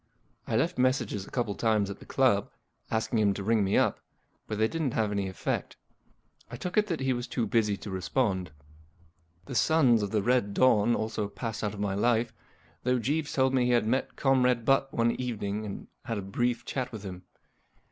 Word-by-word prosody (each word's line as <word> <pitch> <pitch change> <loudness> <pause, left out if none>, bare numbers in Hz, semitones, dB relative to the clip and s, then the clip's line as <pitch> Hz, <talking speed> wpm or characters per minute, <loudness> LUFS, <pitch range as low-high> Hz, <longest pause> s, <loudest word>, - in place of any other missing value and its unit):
I - - -1
left 165 +8 +1
messages 125 -6 +1
a - - -10
couple 120 -5 -1
of - - -7
times 110 -3 +2
at 100 - -9
the - - -14
club, - - +2 0.4
asking 110 +1 0
him 100 -2 +3
to 100 - -4
ring 110 0 +2
me 95 - +2
up, - - +2 0.5
but 110 - -3
they 110 +1 +3
didn't 155 -2 -2
have 110 -2 +1
any 100 -1 -1
effect. 95 - -3 0.7
I 120 - -7
took 180 +9 -5
it 210 0 +3
that 170 -7 -2
he 135 -1 +1
was 120 0 -4
too 120 - -1
busy 105 -2 +1
to 100 - -8
respond. 95 0 -1 1.0
The - - -7
Sons 125 -4 +4
of 100 - -2
the 105 -1 0
Red 120 -4 +1
Dawn 120 -2 +4
also 110 -1 -2
passed 110 +1 -5
out 105 0 -2
of - - -9
my 100 -1 -1
life, 115 +2 +1 0.5
though 125 0 +1
Jeeves 145 +6 -1
told 130 -1 +2
me 125 -2 +3
he 125 - +2
had 120 -2 +3
met 130 +4 -1
Comrade 125 -3 +2
Butt 135 +1 +3
one 115 -1 +2
evening 110 -4 -3
and 100 - -7 0.2
had 115 -3 -2
a 100 - -4
brief 120 +5 -1
chat 130 -2 -3
with 110 -3 -8
him. 90 -2 -7
115 Hz, 210 wpm, -29 LUFS, 105-125 Hz, 1.0 s, Sons